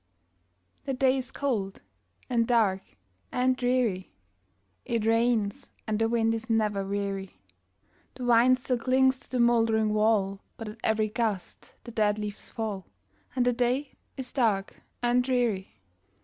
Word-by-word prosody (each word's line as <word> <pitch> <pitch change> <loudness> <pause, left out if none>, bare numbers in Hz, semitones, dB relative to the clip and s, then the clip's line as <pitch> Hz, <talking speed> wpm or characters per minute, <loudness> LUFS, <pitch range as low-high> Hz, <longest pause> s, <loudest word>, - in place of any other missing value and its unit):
The 270 - -2
day 265 +1 +3
is 255 - -6
cold, 215 -9 -2 0.5
and 230 -2 +1
dark, 215 -6 +3 0.5
and 255 +1 +2
dreary; 245 - 0 0.7
It 230 -2 -1
rains, 225 -2 +1 0.2
and 215 -1 -1
the 225 0 +2
wind 225 -1 +2
is 225 +1 -5
never 210 -3 +1
weary; 195 - -4 0.8
The 255 - -7
vine 245 +1 +5
still 250 -1 -2
clings 260 +2 +3
to - - -14
the 255 - -2
moldering 225 -2 +3
wall, 210 -2 +2 0.2
But 225 -3 -6
at 215 +2 -11
every 215 -1 +1
gust 215 -4 -3
the 235 - -9
dead 210 -2 +1
leaves 210 -1 -5
fall, 210 -5 -4 0.5
And 250 -2 +2
the 245 - +3
day 250 +4 0 0.3
is 260 -2 -5
dark 215 -7 0 0.2
and 240 +1 +3
dreary. 235 - -1
225 Hz, 145 wpm, -28 LUFS, 210-250 Hz, 0.8 s, vine